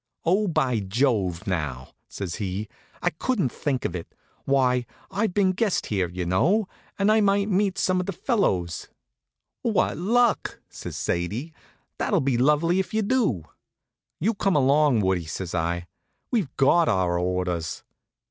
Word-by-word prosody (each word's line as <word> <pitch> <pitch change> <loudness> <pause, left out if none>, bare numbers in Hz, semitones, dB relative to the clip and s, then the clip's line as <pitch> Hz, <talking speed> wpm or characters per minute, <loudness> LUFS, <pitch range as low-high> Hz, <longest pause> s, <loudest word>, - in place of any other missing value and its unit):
"Oh, 195 +5 +3
by 130 - +1
Jove, 100 -4 0
now!" 75 - -3 0.2
says 95 -4 -5
he, 100 +1 -3 0.4
"I - - +2
couldn't 185 - 0
think 135 -5 -2
of 90 - -2
it. 85 - -7 0.3
Why, 125 -3 +2 0.2
I've 205 -1 -1
been 200 -2 +4
a - - +1
guest 205 0 0
here, 95 -5 -1
y'know, 95 - +1 0.3
and 200 +1 +3
I 220 0 +4
might 200 0 +2
meet 195 -1 +1
some 185 +1 +2
of 180 - -3
the - - 0
fellows." 95 - 0 0.7
"What 220 -9 +1
luck!" 235 +5 +2
says - - -7
Sadie. 105 - -2 0.5
"That'll - - +2
be 135 -2 +1
lovely 150 +7 +3
if 190 +3 -3
you 220 - +2
do." 205 - +1 0.8
"You 215 +8 +1
come 195 -3 +1
along, 140 -3 +4
Woodie," 95 -3 +1
says 85 +2 -5
I. 85 0 -1 0.5
"We've 215 - +1
got 165 +5 +4
our 90 -4 +1
orders." 90 -2 -2
135 Hz, 150 wpm, -25 LUFS, -, 0.8 s, been